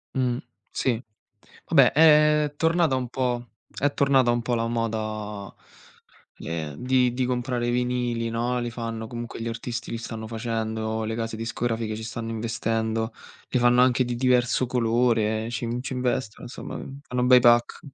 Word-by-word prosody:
Mh, 125 -2 +1 0.3
sì. 125 -3 0 0.6
Vabbè - - +5
è 150 -1 +5
tornata 165 -3 +2
un 125 -1 -2
po' 125 -2 -2 0.3
è 145 +1 +2
tornata 135 -3 +3
un 120 - 0
po' 120 - -1
la 115 0 0
moda, 110 -3 -3 0.9
ehm, 80 -3 -4
di 125 -1 +2
di 130 +1 -1
comprare 125 -1 -1
i 120 - +1
vinili, 120 -1 -1
no, 120 +2 -1
li 120 -1 -2
fanno 115 -1 -5
comunque 120 -1 -7
gli 115 - -2
artisti 115 0 -5
li 115 - -3
stanno 110 -1 -6
facendo, 110 -1 -2
le 110 - -2
case 115 -1 -3
discografiche 115 -1 -2
ci 110 - -7
stanno 115 +1 -5
investendo, 115 0 -1 0.4
li 125 - +2
fanno 125 0 +5
anche 130 0 +3
di 120 - -2
diverso 125 0 +2
colore, 115 -2 +1
ci 120 0 -3
in 120 +2 -2
ci 130 - -5
investono 125 -3 -2
insomma, 120 - -7
uhm, 135 +1 -8
fanno 125 -3 -1
bei 125 0 +7
pack. 120 0 +4
120 Hz, 165 wpm, -25 LUFS, 115-125 Hz, 0.9 s, bei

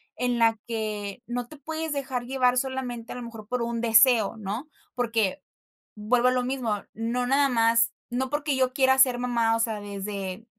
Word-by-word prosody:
en 245 0 0
la 225 -1 +3
que 215 -1 -4
no 245 0 -3
te 305 - -12
puedes 320 +2 -4
dejar 265 -3 -3
llevar 255 -1 +2
solamente, 250 -3 -3
a - - -9
lo 250 - -6
mejor, 225 -3 -9
por 250 +2 -2
un 235 0 -2
deseo, 230 -1 +5
¿no? 220 +8 -5 0.2
Porque, 230 0 0 0.5
vuelvo 240 +4 +2
a - - +2
lo 255 0 +1
mismo, 245 -5 -2
no 235 +2 -2
nada 275 +2 +3
más 230 -1 +3 0.2
no 255 +2 -2
porque 295 0 -1
yo 260 -1 +1
quiera 265 0 +4
ser 255 -2 +5
mamá, 235 -2 +1
o 230 - -1
sea, 225 -2 0
desde 200 0 -5
240 Hz, 185 wpm, -26 LUFS, 225-255 Hz, 0.5 s, deseo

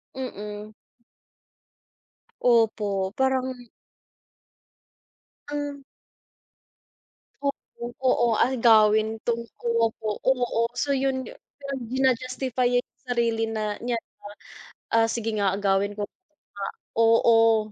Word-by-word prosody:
Mm. 210 -4 -6 1.7
Opo, 210 -5 +2
parang 265 -1 +2 2.0
Hmm. 290 -1 -4 1.6
Opo, 280 -3 -5 0.2
oo. 250 -2 +3
Agawin 220 -3 +4
tungkol 235 -1 0
po, 215 -2 -3
oo. 245 -3 +1
So 285 +3 -1
'yon 265 -1 0
yu - - -10 0.5
ji-na-justify 255 0 0
niya 245 0 +2
yung 240 - -46
sarili 230 -2 +1
na 220 -1 -3 0.2
niya 240 0 -1 0.9
na, 225 0 +4
"Ah, - - -6
sige 225 -1 -2
nga, 200 -2 +2
agawin 200 0 +1
ko 210 - -3
nga" 300 - -10 0.3
oo. 225 -1 +5
230 Hz, 90 wpm, -25 LUFS, 215-255 Hz, 2.0 s, oo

